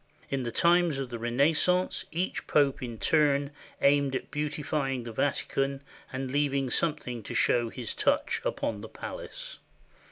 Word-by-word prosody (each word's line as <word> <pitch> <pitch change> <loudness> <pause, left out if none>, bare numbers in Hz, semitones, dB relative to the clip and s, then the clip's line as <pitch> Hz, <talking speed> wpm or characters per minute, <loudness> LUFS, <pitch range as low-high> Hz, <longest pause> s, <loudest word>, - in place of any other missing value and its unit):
In 135 -1 0
the 120 -2 -3
times 170 0 +4
of 135 -2 -4
the 120 - -4
Renaissance 150 +10 +2
each 175 +3 -2
Pope 140 -3 +3
in 120 -3 -5
turn 145 +4 +3 0.3
aimed 140 -1 +4
at - - -4
beautifying 150 -3 -1
the 115 - -6
Vatican 135 +2 -1 0.3
and 130 0 -3
leav 145 0 +1
ing 135 -2 0
something 145 -8 -1
to - - -7
show 120 -1 +3
his 120 -1 -4
touch - - +1
upon 105 -2 -2
the 110 - -8
palace. - - -7
140 Hz, 155 wpm, -29 LUFS, 125-150 Hz, 0.3 s, times